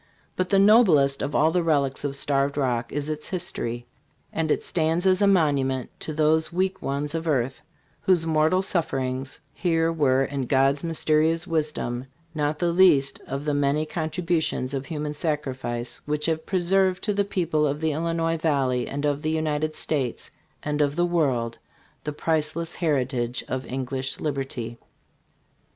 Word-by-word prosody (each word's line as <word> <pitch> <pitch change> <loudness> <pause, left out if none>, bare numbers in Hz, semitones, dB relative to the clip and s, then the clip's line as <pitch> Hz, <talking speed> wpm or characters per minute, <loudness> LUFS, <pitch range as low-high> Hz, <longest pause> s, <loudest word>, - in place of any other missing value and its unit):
But 185 0 -1
the 195 - +3
noblest 190 - +5
of 140 - -3
all 155 +2 +4
the 180 - +2
relics 140 -5 +1
of 140 -1 +1
Starved 140 0 +1
Rock 125 -4 0
is 145 0 -3
its 155 -1 -4
history; 120 -10 -3 0.5
and 160 -1 -1
it - - +1
stands 165 +2 0
as 190 +1 +3
a 200 - +5
monument 140 -8 +2
to - - -4
those 155 +1 +2
weak 190 +2 -1
ones 145 +2 -2
of 165 0 -3
earth 135 -4 0 0.4
whose 180 -4 +2
mortal 160 +4 +2
sufferings 135 -7 -2
here 165 -2 +1
were, 135 -4 +3
in 135 -2 -3
God's 135 +2 +2
mysterious 165 0 +1
wisdom, 150 -7 -2 0.3
not 150 -1 -1
the 170 +2 +1
least 170 -7 +4
of 140 +2 -4
the 150 - 0
many 145 +2 +1
contribu 165 +1 -1
tions 130 -3 -2
of 135 -1 -3
human 150 -1 -3
sacrifice 130 -6 -3
which 150 0 -1
have 160 -1 -1
preserved 190 0 +2
to 210 - 0
the 200 0 +2
people 165 -6 0
of 145 +1 -2
the 160 0 0
Illinois 165 +1 -1
valley, 135 -6 0
and 145 +1 -3
of 145 0 0
the 155 - -1
United 155 -1 -1
States, 135 -6 -2 0.3
and 150 0 -1
of 145 -1 +1
the 175 +1 +2
world, 135 -9 0 0.5
the 150 - -1
priceless 160 +2 -1
heritage 130 -6 -1
of 130 0 -4
English 130 +1 -3
Liberty. 130 -5 -4
150 Hz, 165 wpm, -25 LUFS, 135-165 Hz, 0.5 s, noblest